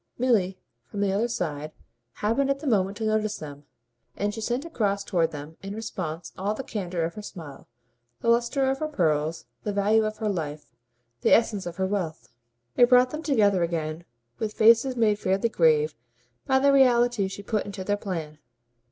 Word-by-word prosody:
Milly, 210 -7 +2 0.3
from 205 - -4
the 200 -1 +2
other 215 +4 +1
side, 155 -9 -4 0.4
happened 230 +6 0
at 275 - +1
the 280 - -10
moment 200 -5 +1
to 225 - -4
notice 215 -1 0
them, 145 -2 -9 0.5
and 205 +1 -1
she 225 - -6
sent 240 +6 -2
across 205 -11 -1
toward 170 -4 +1
them 150 +1 -9
in 195 +1 -6
response 180 -7 -5
all 200 +3 -2
the 270 - -5
candour 185 -8 -3
of 165 +1 -2
her 210 - -7
smile, 165 -9 -10 0.5
the - - -5
lustre 240 +4 +2
of 270 0 0
her 310 - -1
pearls, 160 - 0 0.2
the 210 - -2
value 205 +2 +3
of 215 0 -3
her 220 - -2
life, 155 -6 -3 0.6
the - - +2
essence 210 -5 0
of 175 - -6
her 190 +1 0
wealth. 185 -5 -3 0.5
It 245 0 +5
brought 250 0 +5
them 305 - -4
together 210 - +3
again 165 -1 -2 0.4
with 215 -1 -2
faces 230 +4 +5
made 210 -3 +2
fairly 195 +4 +1
grave 155 -5 +3 0.5
by 265 - +4
the 280 +1 +4
reality 240 -5 +4
she 200 +1 -8
put 210 0 -1
into 195 -1 -6
their 205 +2 0
plan. 165 -7 -5
205 Hz, 185 wpm, -26 LUFS, 170-230 Hz, 0.6 s, It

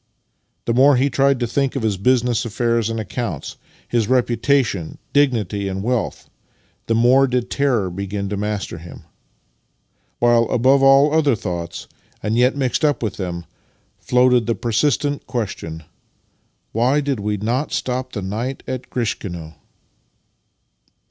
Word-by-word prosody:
The 115 - +1
more 135 +3 +6
he 135 +3 +2
tried 140 -1 +2
to - - +2
think 135 +3 -1
of 135 - -2
his 110 -3 +1
biisiness 125 +1 +2
affairs 115 0 0
and 115 0 -3
accounts, 110 - -5 0.3
his 115 -3 0
reputation, 120 - +1 0.2
dignity 110 -8 +1
and 95 0 -3
wealth, 120 0 -2 0.6
the 115 - +1
more 125 +4 +5
did 125 -1 -2
terror 130 -9 +1
begin 100 +2 -4
to 105 - -2
master 105 -3 -3
him; 85 +1 -11 1.1
while, 120 -1 +4
above 130 +3 +3
all 135 +2 +6
other 150 -5 +3
thoughts, 85 -6 -5 0.4
and 105 +1 0
yet 125 +3 +3
mixed 130 +2 0
up 145 -4 +2
with 110 - -3
them, 85 -3 -4 0.5
floated 125 -1 +3
the 115 - +1
persistent 145 +5 0
question 90 - -4 0.3
— - - -43
*' - - -47
Why 125 +6 +2
did 140 -4 -1
we 105 +1 -1
not 120 +8 -1
stop 130 0 -2
the 105 - -4
night 115 +8 -4
at 130 -1 -5
Grishkino? 90 -9 -4
120 Hz, 145 wpm, -20 LUFS, 105-130 Hz, 1.1 s, more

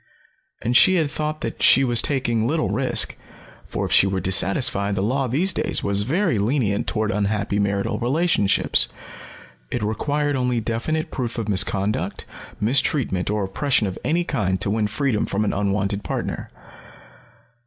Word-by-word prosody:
And 120 +2 0
she 185 +8 +6
had 155 -5 +1
thought 155 0 -3
that 115 - -5
she 135 - +6
was 120 -3 +3
taking 120 -5 0
little 155 - 0
risk, 120 +2 0 0.5
for - - -3
if - - -5
she 100 - +5
were 95 -1 -1
dissatisfied, 100 +2 +1
the 95 - -1
law 130 +5 0
these 165 +10 +1
days - - -1
was 100 0 0
very 160 - 0
lenient 105 -2 0
toward 110 -1 -1
unhappy 100 0 -1
marital 100 -1 -1
relationships. 130 - +2 0.8
It - - -3
required 145 +7 -1
only 125 -2 0
definite 120 +8 -2
proof 120 -4 -4
of 115 -2 -3
misconduct, 100 +1 0 0.3
mistreatment, 110 -4 +1
or 105 -1 0
oppression 115 +5 +1
of 95 -2 -4
any 170 +3 +1
kind 95 - -1
to 100 - 0
win 110 0 +1
freedom 110 +1 -1
from 105 +2 -1
an - - 0
unwanted 100 0 -1
partner. - - -4
110 Hz, 155 wpm, -22 LUFS, 100-135 Hz, 0.8 s, she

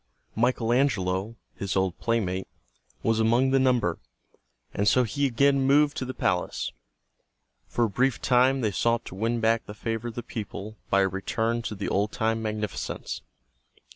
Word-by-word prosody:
Michael 120 0 +1
Angelo, 105 -5 +1 0.2
his 100 -1 -4
old 95 -2 0
playmate, 95 -5 -1 0.6
was 115 0 +2
among 120 +4 +3
the 135 - +4
number, 125 -10 +2 0.7
and 100 - 0
so 125 +3 +5
he 130 +5 0
again 140 +2 +3
moved 145 +2 +4
to 130 - -2
the 130 - -5
palace. 90 -1 -1 1.0
For 120 - 0
a 115 - +2
brief 130 +4 +1
time 130 +1 +3
they 110 -3 +1
sought 115 +4 +1
to - - -8
win 115 +5 -1
back 115 +1 +2
the 105 - -8
favor 115 +1 -3
of 115 - -6
the 120 - -4
people 105 -1 -6
by 100 - +4
a 95 - +3
return 110 +5 -1
to 110 - -4
the 100 - -4
old 100 +2 0
time 115 0 0
magnificence. 105 -1 -4
115 Hz, 170 wpm, -26 LUFS, 105-125 Hz, 1.0 s, so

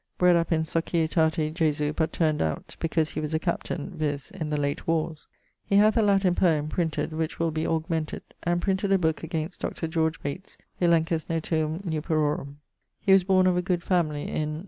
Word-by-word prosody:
Bred 180 -1 +5
up 170 0 +1
in 160 -1 +2
Societate 160 -1 0
Jesu; 150 -3 0
but 160 0 0
turn'd 155 -3 +1
out 80 -1 -3
because 160 -1 0
he - - -4
was 155 +1 -2
a - - +1
captaine, 170 -2 -3
viz. 145 +3 -3
in 165 -6 -5
the 150 -1 -1
late 140 0 -2
warres. 160 -1 -1 0.4
He 200 - 0
hath 210 +2 +5
a 230 - +4
Latin 195 -3 +3
poem, 155 -4 +2
printed, 160 -1 -1
which 160 +1 -2
will 165 -1 0
be 155 +1 -2
augmented; 160 -1 -2 0.2
and 175 0 0
printed 195 0 0
a - - +5
booke 160 -3 0
against 165 +1 -4
Dr. 165 - -3 0.4
Bates' 145 +7 -6 0.2
Elenchus 165 -1 +2
motuum 160 +2 -1
nuperorum. 155 -3 -1 0.4
He 195 - +3
was 195 -1 +6
borne 185 0 +3
of 180 -1 +3
a - - +2
good 175 -1 -1
family 155 -5 0
in 155 0 -2
160 Hz, 190 wpm, -26 LUFS, 155-175 Hz, 0.4 s, was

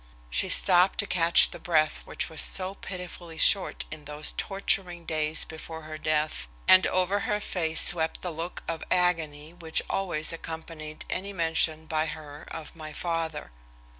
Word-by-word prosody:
She - - +2
stopped 180 +1 +4
to - - +1
catch 170 -3 +5
the - - -9
breath 155 -3 +1
which - - -3
was 160 - +4
so 190 0 +4
pitifully 180 -3 -9
short 195 - +3
in 155 -1 -9
those 150 +1 +2
torturing 195 -3 -1
days 155 -1 +1
before 160 0 -9
her 155 0 -8
death, 155 - -1 0.2
and 185 0 +7
over 185 +2 0
her 210 0 0
face 165 -6 +1
swept 160 -2 +2
the 180 - -3
look 165 +3 -6
of 165 -1 -4
agony 165 -4 -1
which 165 -2 -2
always 175 -5 -2
accompanied 160 -1 -8
any 200 +2 -4
mention 160 -2 0
by 155 0 -1
her 150 -1 -9
of 160 -1 -9
my 155 -2 -9
father. 165 - -4
165 Hz, 160 wpm, -26 LUFS, 155-180 Hz, 0.2 s, and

